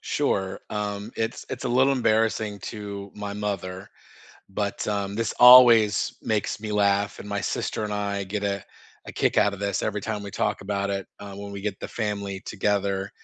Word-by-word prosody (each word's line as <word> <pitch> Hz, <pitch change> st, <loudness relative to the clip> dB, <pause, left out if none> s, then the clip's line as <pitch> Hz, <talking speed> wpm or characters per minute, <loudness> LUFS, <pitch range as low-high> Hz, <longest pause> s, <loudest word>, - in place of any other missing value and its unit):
Sure, 95 Hz, -1 st, -1 dB
um, 105 Hz, +1 st, -3 dB
it's 115 Hz, +1 st, -3 dB
it's -, -, -5 dB
a -, -, 0 dB
little 130 Hz, +3 st, +4 dB
embarrassing 110 Hz, -4 st, +1 dB
to 100 Hz, -2 st, -7 dB
my 105 Hz, -1 st, -5 dB
mother, 100 Hz, -2 st, -4 dB, 0.6 s
but, 100 Hz, +1 st, -3 dB
um, 100 Hz, -1 st, -2 dB
this 115 Hz, 0 st, -1 dB
always 120 Hz, -4 st, +8 dB
makes 105 Hz, -1 st, -1 dB
me 105 Hz, 0 st, -5 dB
laugh, 100 Hz, 0 st, +1 dB
and -, -, -9 dB
my 100 Hz, -1 st, -2 dB
sister -, -, -2 dB
and 105 Hz, -1 st, -3 dB
I 100 Hz, -1 st, -2 dB
get 100 Hz, +2 st, -4 dB
a 100 Hz, -1 st, -1 dB, 0.4 s
a -, -, -7 dB
kick -, -, 0 dB
out 100 Hz, -1 st, +4 dB
of 100 Hz, -, -8 dB
this, 100 Hz, -1 st, -1 dB
every 105 Hz, -, -1 dB
time 105 Hz, 0 st, -4 dB
we 100 Hz, -, -7 dB
talk 105 Hz, +1 st, -1 dB
about 100 Hz, 0 st, -2 dB
it, 100 Hz, -1 st, -2 dB
uh, 100 Hz, 0 st, -8 dB
when 100 Hz, 0 st, -7 dB
we 100 Hz, -, -6 dB
get 100 Hz, -1 st, -3 dB
the -, -, -4 dB
family 100 Hz, -3 st, -3 dB
together. 100 Hz, -1 st, -1 dB
100 Hz, 190 wpm, -25 LUFS, 100-105 Hz, 0.6 s, always